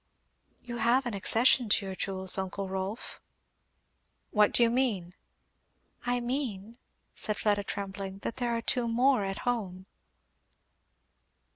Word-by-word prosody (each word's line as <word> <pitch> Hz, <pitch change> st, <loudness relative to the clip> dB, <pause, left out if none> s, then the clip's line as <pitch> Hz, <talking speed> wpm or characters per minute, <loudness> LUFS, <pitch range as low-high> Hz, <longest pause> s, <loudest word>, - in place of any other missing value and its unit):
"You 240 Hz, -1 st, -6 dB
have 245 Hz, +3 st, +2 dB
an 240 Hz, -, -3 dB
accession 230 Hz, +4 st, +3 dB
to 200 Hz, 0 st, +4 dB
your 190 Hz, -, -4 dB
jewels, 190 Hz, -1 st, +2 dB
uncle 190 Hz, +1 st, -3 dB
Rolf." 190 Hz, +3 st, -5 dB, 1.1 s
"What 210 Hz, -1 st, +4 dB
do 240 Hz, -, +4 dB
you 230 Hz, -, +3 dB
mean?" 215 Hz, -9 st, 0 dB, 0.9 s
"I 245 Hz, 0 st, +1 dB
mean," 240 Hz, -3 st, -4 dB, 0.3 s
said 210 Hz, -, -1 dB
Fleda 205 Hz, -1 st, +1 dB
trembling, 195 Hz, -1 st, -5 dB
"that -, -, -4 dB
there 245 Hz, -2 st, -1 dB
are 230 Hz, -, -5 dB
two 245 Hz, 0 st, 0 dB
more 245 Hz, 0 st, +3 dB
at 195 Hz, 0 st, -3 dB
home." 195 Hz, -7 st, -2 dB
210 Hz, 130 wpm, -29 LUFS, 195-240 Hz, 1.1 s, to